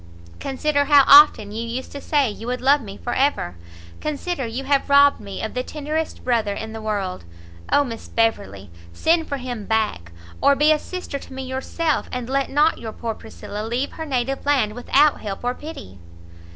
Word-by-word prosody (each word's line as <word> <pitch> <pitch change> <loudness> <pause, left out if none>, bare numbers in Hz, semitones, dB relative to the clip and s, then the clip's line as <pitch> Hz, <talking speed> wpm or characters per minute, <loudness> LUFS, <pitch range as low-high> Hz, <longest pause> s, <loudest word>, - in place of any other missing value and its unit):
consider 285 +1 0
how 285 -1 +7
often 280 -8 +7
you 225 +2 -4
used 235 +3 -5
to 280 - -7
say 285 -2 +2
you 220 +2 -7
would 250 0 -2
love 280 +3 +4
me 200 -3 -9
for 240 - -4
ever! 265 - 0 0.4
consider 305 -2 -3
you 240 +4 -4
have 275 +1 +1
robbed 280 0 +6
me 200 -3 -7
of 220 - -4
the 250 - -1
tenderest 305 +3 -4
brother 225 -5 +1
in 220 +1 -6
the 225 - -7
world! 200 - -3 0.5
Oh 290 - +5
Miss 230 -4 -7
Beverley, 100 - -1 0.2
send 325 - +2
for 280 - -2
him 245 -5 -6
back, 215 - -1 0.3
or 280 0 +5
be 300 +2 +4
a 305 - +3
sister 360 -6 -6
to 265 - -12
me 265 0 -5
yourself, 265 +5 -2
and 250 -2 -4
let 275 +1 0
not 300 +3 +2
your 220 -2 -6
poor 230 -1 -4
Priscilla 215 -1 -8
leave 240 +5 -2
her 320 - -6
native 265 0 -1
land 265 -7 +2
without 280 +5 +2
help 200 0 -6
or 245 0 0
pity!" 255 - -10
255 Hz, 190 wpm, -22 LUFS, 220-285 Hz, 0.5 s, how